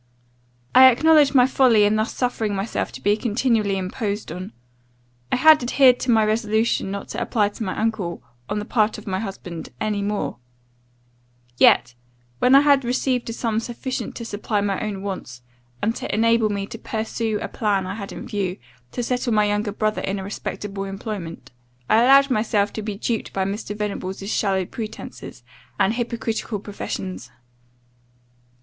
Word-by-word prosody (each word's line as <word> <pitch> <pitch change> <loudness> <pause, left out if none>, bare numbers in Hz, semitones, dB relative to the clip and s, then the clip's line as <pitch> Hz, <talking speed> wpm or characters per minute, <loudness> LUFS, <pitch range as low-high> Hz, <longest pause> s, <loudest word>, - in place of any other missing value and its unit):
I 260 +1 +9
acknowledge 295 +2 +4
my 250 -2 +7
folly 255 -5 +4
in 205 +1 +3
thus 215 +2 0
suffering 225 -5 -1
myself 195 +3 -2
to - - -9
be 205 +1 +3
continually 220 -3 +1
imposed 200 +1 -3
on. 180 +3 -6 0.8
I - - +3
had 310 +3 +6
adhered 250 0 +4
to 255 - -4
my 220 -2 +5
resolution 220 -1 +1
not 200 0 -5
to - - -4
apply 210 -4 +1
to 210 - -7
my 185 - -3
uncle, 210 -6 -2 0.3
on 210 - -1
the 210 - -3
part 215 -2 +1
of 210 - -11
my 190 -2 -2
husband, 185 -5 -6
any 210 -1 -1
more; 205 -9 -2 1.2
yet, 125 - +5 0.5
when 255 - +5
I 275 - +8
had 285 -2 +4
received 250 0 -1
a - - -3
sum 225 -2 -1
sufficient 245 +3 -5
to 235 - -6
supply 210 0 -2
my 200 -1 -1
own 205 -3 -4
wants, 125 -11 -6 0.4
and 225 +2 +1
to - - -4
enable 230 0 +3
me 200 -1 -2
to 225 +2 -9
pursue 220 -1 -2
a - - -4
plan 200 -4 0
I 185 - -4
had 200 -2 -7
in - - -7
view, 195 -2 -2 0.4
to 245 - -2
settle 245 -1 -1
my 210 -1 +4
younger 205 0 0
brother 215 +1 -1
in 195 +1 -2
a 190 - -5
respectable 195 0 -5
employment, 195 - -6 0.4
I 215 - +4
allowed 275 +2 +6
myself 215 -3 +1
to 220 - -4
be 210 -1 -4
duped 225 +1 -3
by 190 -1 0
Mr. 205 +1 -4
Venables' 195 -2 -4
shallow 190 -3 +1
pretences, 215 +3 -8 0.4
and 205 - +3
hypocritical 230 -2 -3
professions. 190 - -6
215 Hz, 170 wpm, -22 LUFS, 200-235 Hz, 1.2 s, I